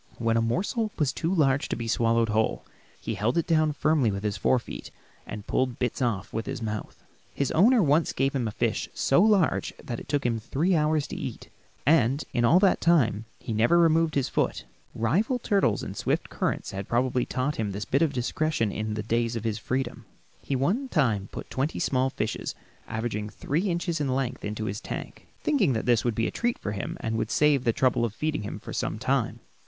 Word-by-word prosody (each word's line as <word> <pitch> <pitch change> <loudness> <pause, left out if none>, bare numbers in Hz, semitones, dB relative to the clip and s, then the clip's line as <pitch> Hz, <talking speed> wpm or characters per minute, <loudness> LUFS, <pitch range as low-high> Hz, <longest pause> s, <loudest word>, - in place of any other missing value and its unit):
When 115 -1 +1
a 115 - +3
morsel 200 - 0
was 145 -4 +1
too 165 - -1
large 145 -6 +2
to - - -1
be 115 0 -4
swallowed 115 0 +2
whole, 110 +1 0 0.3
he - - -4
held 115 +8 0
it 170 - +2
down 155 -2 +3
firmly 150 -4 +2
with 100 0 -3
his 105 -1 -1
fore 105 +6 +2
feet 120 - -7 0.4
and 105 -1 -7
pulled 130 -2 0
bits 125 0 -2
off 110 -5 -1
with 110 +1 -3
his - - -3
mouth. 110 -2 -5 0.3
His 140 - 0
owner 220 +6 +5
once 150 +2 +3
gave 135 +1 0
him 125 -4 0
a - - -3
fish - - -1
so 135 - +3
large 205 -5 +2
that 120 -2 -6
it - - -12
took 145 -2 0
him 115 -2 +1
three 160 - 0
hours 150 -1 +2
to - - -5
eat - - -5
it, - - -27 0.3
and 140 -1 +3
in 120 - +1
all 165 +10 +6
that 195 -2 +4
time 115 -11 +3
he 115 - -5
never 115 +10 +4
removed 165 -1 +3
his 140 -3 +1
foot. - - -1 0.3
Rival 185 - +1
turtles 200 - +1
and - - -6
swift - - -1
currents - - -2
had 100 +1 -6
probably 125 +1 +1
taught 140 +4 -1
him 105 -2 -1
this 100 +2 -4
bit 140 - +1
of 160 -3 +3
discretion 130 -2 0
in 110 +1 -3
the 105 - -3
days 115 +1 0
of 115 - -3
his 110 -1 -1
freedom. 130 +1 -3 0.4
One 180 - 0
time 120 - +2
he 100 - -10
put - - -9
twenty 135 +4 -1
small 130 0 +1
fish 110 -4 -2 0.5
averaging 110 -2 -3
three 165 - -1
inches 170 -2 -1
in 145 - 0
length 130 -1 -2
into 105 +1 -3
his 105 0 -4
tank, - - -7 0.2
thinking 225 - +2
this 115 0 +2
would 120 -3 0
be 115 - +1
a - - -1
treat 240 0 -1
for 105 - -4
him 100 -2 -4
and 110 0 -1
would 110 - -2
save 145 -1 +3
the 115 - +4
trouble 125 0 +2
of 110 -3 -2
feeding 150 +2 -1
him 105 - -5
for - - -8
some - - -2
time. - - -1
130 Hz, 215 wpm, -27 LUFS, 110-155 Hz, 0.5 s, all